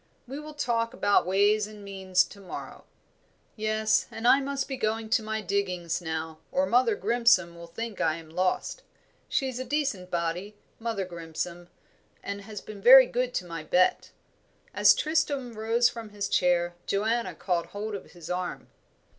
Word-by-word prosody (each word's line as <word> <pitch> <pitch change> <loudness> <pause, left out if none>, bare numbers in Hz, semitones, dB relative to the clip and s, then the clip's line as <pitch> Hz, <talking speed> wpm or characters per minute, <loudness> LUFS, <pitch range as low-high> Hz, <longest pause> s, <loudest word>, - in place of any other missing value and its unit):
We 270 +4 -6
will 300 0 -9
talk 235 -3 -1
about 205 -6 +3
ways 205 +2 +3
and 210 -1 -12
means 190 -2 +1
to 200 - -12
morrow." 195 - -9 0.7
"Yes, 215 0 +1
and 225 +2 -3
I 270 - +7
must 275 0 -2
be 270 - -3
going 220 -1 -2
to - - +4
my 220 0 -3
diggings 185 -4 -1
now, 160 -1 -4
or 275 +1 +2
Mother 245 -4 +3
Grimson 215 -5 +3
will 170 0 -10
think 220 +5 -6
I 160 -1 +2
am 165 -1 -11
lost. 185 - -1 0.5
She's 260 -3 -1
a - - -2
decent 260 -9 -2
body, 175 +4 -2 0.2
Mother 225 -4 -2
Grimson, 170 0 -6 0.6
and 200 0 -5
has 210 0 -8
been 210 -2 -10
very 260 +4 +10
good 250 +1 -1
to 180 - -1
my 165 -2 -6
Bet." 180 +3 +2 0.6
As - - +6
Tristram 285 -6 0
rose 225 +2 +2
from 230 -2 -6
his 205 -1 -3
chair, 175 -2 +2
Joanna 220 +4 0
caught 175 -3 -1
hold 210 +1 -5
of 200 - -8
his 175 -3 -11
arm. 180 0 -4
205 Hz, 165 wpm, -27 LUFS, 180-235 Hz, 0.7 s, very